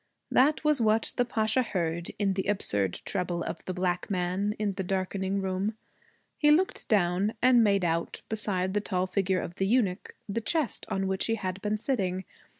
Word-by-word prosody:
That 290 +5 +4
was 300 -4 +3
what 220 0 +2
the 245 - +2
Pasha 220 +1 +1
heard, 170 -6 -2
in 200 -2 +1
the 190 0 -2
absurd 100 - 0
treble 175 -3 -1
of - - -5
the 185 - -3
black 180 -1 -1
man, 190 +2 -1
in 210 -2 -1
the 190 0 -3
darkening 190 +1 -1
room. 190 +3 -1 0.6
He 295 - +4
looked 350 +6 +2
down 200 -1 +2
and 245 -1 +5
made 200 -3 +3
out, 165 0 -2
beside 190 -4 -1
the 205 - +1
tall 185 -2 -1
figure 185 0 0
of 170 - -6
the 195 - +1
eunuch, 210 -4 0
the 220 +3 -2
chest 305 +3 -1
on 195 0 -1
which 190 0 0
he 225 - +1
had 190 -2 -4
been 210 +1 0
sitting. 190 -6 -1
195 Hz, 185 wpm, -28 LUFS, 185-220 Hz, 0.6 s, and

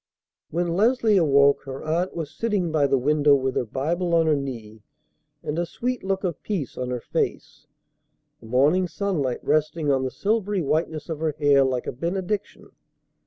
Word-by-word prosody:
When 175 +2 -1
Leslie 220 +3 +3
awoke, 140 -4 +4
her 135 0 -7
aunt 170 +4 -1
was 160 -3 -4
sitting 205 -7 -1
by 150 -3 +2
the 135 - +2
window 145 +2 +4
with 130 -1 -1
her - - 0
Bible 170 +9 -1
on 165 -1 +4
her 155 -1 +3
knee 115 -6 -6 0.6
and 150 +3 -3
a 175 - 0
sweet 250 +5 -3
look 190 0 -1
of 175 -5 -3
peace 185 - -3
on 125 0 -4
her 125 -1 -2
face, - - -3 0.7
the 110 - -14
morning 145 +10 +3
sunlight 165 -10 -2
resting 155 0 +1
on 135 -1 +1
the 130 - -1
silvery 200 - -1
whiteness 155 0 -1
of 160 -3 -4
her 160 -1 -1
hair 145 -2 +4
like 130 -2 -1
a - - -2
benediction. 190 - -4
155 Hz, 175 wpm, -24 LUFS, 135-180 Hz, 0.7 s, awoke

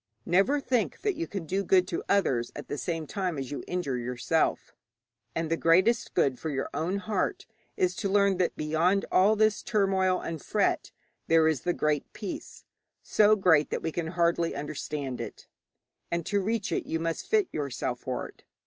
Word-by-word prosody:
Never 195 +12 +3
think 250 -5 -1
that 415 -1 +1
you 335 +2 -3
can 195 -5 -5
do 190 +5 -1
good 185 -1 +4
to 170 - -3
others 130 -12 +2
at - - -8
the 145 - -3
same 165 -2 -3
time 180 0 -2
as 135 -2 -5
you 145 - -4
injure 145 -9 -2
yourself, 125 +6 -1 0.6
and 165 0 -1
the - - +4
greatest 185 +9 +3
good 135 -7 +2
for 160 - -3
your 135 -2 -3
own 180 +5 -1
heart 205 -1 -2 0.3
is 185 0 +1
to 200 - -1
learn 200 -1 +3
that 180 -1 0
beyond 165 +6 +1
all 200 +4 +5
this 215 -1 +2
turmoil 190 -4 +1
and 165 -3 -5
fret - - 0 0.4
there 165 -1 +5
is 155 -6 +1
the 175 - 0
Great 150 -3 -1
Peace 205 - -7 0.4
so 215 0 +4
great 165 -7 +4
that - - -3
we 160 - -1
can 165 0 -3
hardly 170 0 +1
understand 145 -2 -4
it, - - -8 0.6
and 170 -1 -2
to 205 -1 +1
reach 215 -1 -1
it - - -1
you 165 - -1
must 165 0 -3
fit 425 -4 +3
yourself 135 -4 -3
for 130 0 -4
it. - - -19
175 Hz, 185 wpm, -28 LUFS, 155-195 Hz, 0.6 s, all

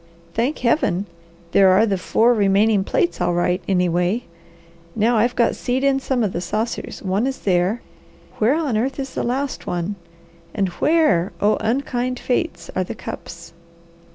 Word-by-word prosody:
Thank 250 +7 0
Heaven, 235 - +1 0.5
there 195 -1 +6
are 190 +4 +5
the 205 -3 0
four 225 +6 +2
remaining 205 -1 +3
plates 345 - 0
all 175 - +1
right, 180 +1 +1
anyway! 180 +4 +1 0.7
Now 225 +2 +2
I've 240 +3 +2
got 235 - +2
seed 255 +2 -1
in 275 -1 +3
some 260 -3 -1
of 200 - -1
the 175 - -2
saucers; 220 +6 -3
one 200 +6 0
is 270 - -3
there; 185 +4 +1 0.6
where 230 +6 +3
on 295 -9 0
earth 255 +4 -1
is 270 -1 -5
the - - -2
last 265 +3 -2
one? 180 +3 -2 0.6
And 195 -3 +1
where, 300 - +3
oh 210 +1 +3
unkind 250 +1 -1
fates! 250 - -2
are 185 - +1
the 185 - -6
cups?" 170 -3 -9
220 Hz, 160 wpm, -21 LUFS, 185-250 Hz, 0.7 s, there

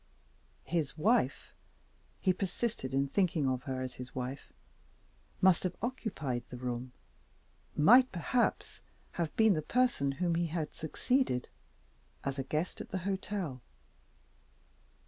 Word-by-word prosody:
His 160 -3 -1
wife 220 +10 +2 0.7
(he 185 - +3
persisted 195 - -2
in 135 +1 +2
thinking 165 -3 +1
of 130 0 -1
her 130 -2 -2
as 130 -1 -5
his 125 0 -9
wife) 130 +2 -5 0.9
must 185 -2 +6
have 180 -1 -2
occupied 205 - -2
the 125 - -7
room 125 0 -4 0.9
might 245 - +7
perhaps 235 +8 0 0.3
have 170 -3 -2
been 220 -2 +5
the 155 - 0
person 235 - +2
whom 170 +4 0
he 170 +1 +1
had 160 -2 -3
succeeded, 160 - 0 0.7
as 140 0 -2
a - - 0
guest 155 +6 -2
at - - -8
the 190 - -2
hotel. 190 -8 -2
160 Hz, 125 wpm, -32 LUFS, 135-195 Hz, 0.9 s, might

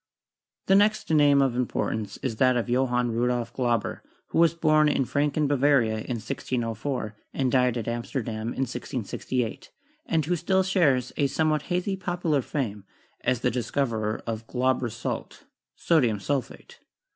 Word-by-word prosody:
The 195 - +3
next 210 -1 +3
name 145 -2 +5
of 130 -3 0
importance 110 -4 -2
is 115 -5 -2
that 130 0 +4
of 120 - -1
Johann 125 -1 +1
Rudolf 120 0 -1
Glauber, 120 -4 -1 0.3
who - - 0
was 165 -1 +4
born 155 -2 +4
in 135 -2 +1
Franken, 145 +2 +1
Bavaria, 135 -5 +3
in 120 +3 -4
1604, 115 -1 -3 0.2
and 130 -2 +1
died 125 -2 +3
at 115 - -4
Amsterdam 115 -1 -3
in 120 - -3
1668, 125 -1 -4 0.4
and 160 -3 +1
who 175 +3 +1
still 190 +3 +1
shares 150 -10 +2
a 145 - +3
some 155 +3 +1
what 155 -1 +1
hazy 180 +2 0
popular 175 -6 -1
fame 110 -7 -3 0.4
as 125 -2 +1
the 125 - +1
discoverer 115 -3 -1
of 115 0 -4
"Glauber's 130 -2 0
salt" - - -5 0.3
(sodium 125 - +2
sulphate). 135 +4 -4
130 Hz, 150 wpm, -26 LUFS, 115-150 Hz, 0.4 s, name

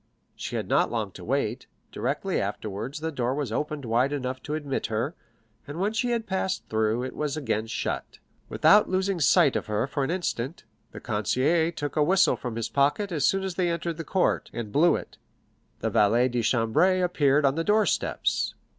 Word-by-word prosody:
She - - -5
had - - -2
not - - +2
long - - -2
to - - -11
wait; - - -2 0.2
directly - - -1
afterwards 110 +8 -4
the 160 0 -2
door 130 -2 -1
was 140 -6 -3
opened 150 +2 -3
wide 120 +4 +2
enough 130 -2 -3
to 150 - -4
admit 145 -3 -3
her, 115 +8 -2 0.5
and 145 +4 -6
when 205 +3 0
she 245 +2 0
had 235 -2 -1
passed 190 -1 -2
through, 110 +2 +1
it 130 - -5
was 150 0 -2
again 115 -7 -1
shut. - - -4 0.3
Without 210 +1 +5
losing 190 0 0
sight 140 - +4
of - - -2
her 105 +3 0
for 140 +1 -2
an 135 - -1
instant, 165 -5 -3 0.3
the - - -9
concierge 150 - +1
took 145 0 -4
a 155 - +2
whistle 190 +5 +4
from 120 -3 -6
his 115 0 -2
pocket 145 - +1
as 150 -5 +2
soon 195 0 +1
as 190 -1 -3
they 175 0 0
entered 170 -1 -2
the 165 - -4
court, 185 +4 0
and 115 -3 -5
blew 165 +9 +4
it. - - -8 0.6
The - - -1
valet 115 +5 +3
de 120 -1 -1
chambre 145 - +2
appeared 145 -5 +2
on 135 - +4
the 165 +3 -1
door 210 +3 +3
steps. - - 0
145 Hz, 200 wpm, -26 LUFS, 120-175 Hz, 0.6 s, Without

